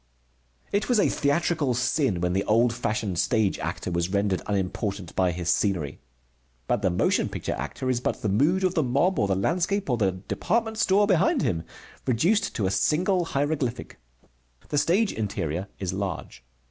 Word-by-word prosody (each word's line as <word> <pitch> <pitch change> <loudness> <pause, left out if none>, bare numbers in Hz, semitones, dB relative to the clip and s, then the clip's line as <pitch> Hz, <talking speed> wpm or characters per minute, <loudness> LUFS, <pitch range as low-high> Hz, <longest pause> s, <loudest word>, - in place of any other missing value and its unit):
It 205 +3 0
was 245 -3 +4
a - - +4
theatrical 145 -2 +1
sin 125 - +1
when 90 0 0
the 95 +1 +1
old 115 +2 +3
fashioned 105 -6 -2
stage 110 -5 +1
actor - - -4
was 85 0 0
rendered 100 -1 0
unimportant 100 -1 -2
by 90 -1 +2
his 85 0 -5
scenery. 85 -6 0 0.7
But 115 - 0
the 95 - +2
motion 90 - +1
picture - - -3
actor 75 - -5
is 125 -2 +1
but 125 - -2
the - - +1
mood 150 - +2
of 185 -1 +2
the 160 - +2
mob 140 +8 +1
or 100 - +2
the 95 - +1
landscape 175 - 0
or 120 - +2
the 95 -5 +1
department 220 - -2
store 205 0 +4
behind 215 - +2
him, 80 -1 -1 0.4
reduced 170 - +2
to 105 - 0
a 95 - +1
single 180 - +2
hieroglyphic. 140 - -2 0.7
The 145 - +2
stage 195 +8 +2
interior 95 -4 -3
is 95 -2 -3
large. 95 -9 -5
120 Hz, 170 wpm, -26 LUFS, -, 0.7 s, was